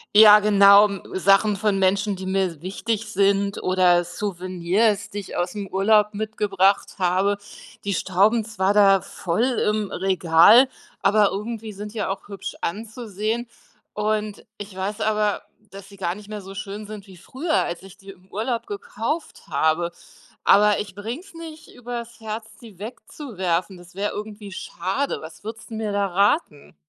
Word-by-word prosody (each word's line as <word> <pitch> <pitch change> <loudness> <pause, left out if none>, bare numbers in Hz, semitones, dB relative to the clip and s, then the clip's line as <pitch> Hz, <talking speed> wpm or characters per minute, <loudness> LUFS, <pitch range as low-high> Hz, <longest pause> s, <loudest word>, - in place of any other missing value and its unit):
Ja, 210 -1 +9
genau, 200 0 +7
m 200 -2 -6
Sachen 195 +2 +4
von 200 -1 0
Menschen, 200 +2 +1
die 185 0 -7
mir 190 -5 -1
wichtig 215 +4 -3
sind 200 0 +1
oder 180 -1 +3
Souvenirs, 190 +3 -1
die 205 - -8
ich 200 - -6
aus'm 195 +3 -3
Urlaub 210 +2 +3
mitgebracht 200 -3 0
habe. 190 +3 +1 0.4
Die 200 -1 -1
stauben 205 +6 +2
zwar 200 -2 0
da 195 -2 +6
voll 180 0 -3
im 215 -5 0
Regal, 190 +7 +5 0.3
aber 205 0 +4
irgendwie 215 +2 -5
sind 205 +1 -8
die - - -6
ja 210 - -1
auch 195 - -5
hübsch 200 -2 -7
anzusehen. 220 +3 -3 0.5
Und 210 0 -2
ich 205 -2 -8
weiß 205 +3 -3
aber, 210 -1 +1 0.3
dass 195 0 -11
sie 200 - -15
gar 175 -2 -2
nicht 210 +1 -12
mehr 210 -1 -6
so 195 0 -10
schön 205 +1 -6
sind 210 -1 -9
wie 190 -2 -14
früher, 300 - -3
als 175 0 -5
ich 195 0 -14
die 195 0 -12
im 185 -1 -20
Urlaub 230 +3 -2
gekauft 225 +9 -5
habe. 160 +3 +1 0.5
Aber 210 0 +5
ich 200 -2 -5
bringe 225 - -6
es 395 0 -17
nicht 325 -1 -11
über's 240 -1 -7
Herz, 220 0 -5 0.2
die 220 -6 -13
wegzuwerfen, 190 - -4
das 175 +1 -16
wäre 205 +1 -1
irgendwie 210 -1 -7
schade. 190 +8 -3
Was 160 +3 -11
würdest 225 +1 -8
'n 220 - -5
mir 215 -1 -2
da 200 0 +1
raten? 185 - 0
205 Hz, 165 wpm, -23 LUFS, 190-215 Hz, 0.5 s, Ja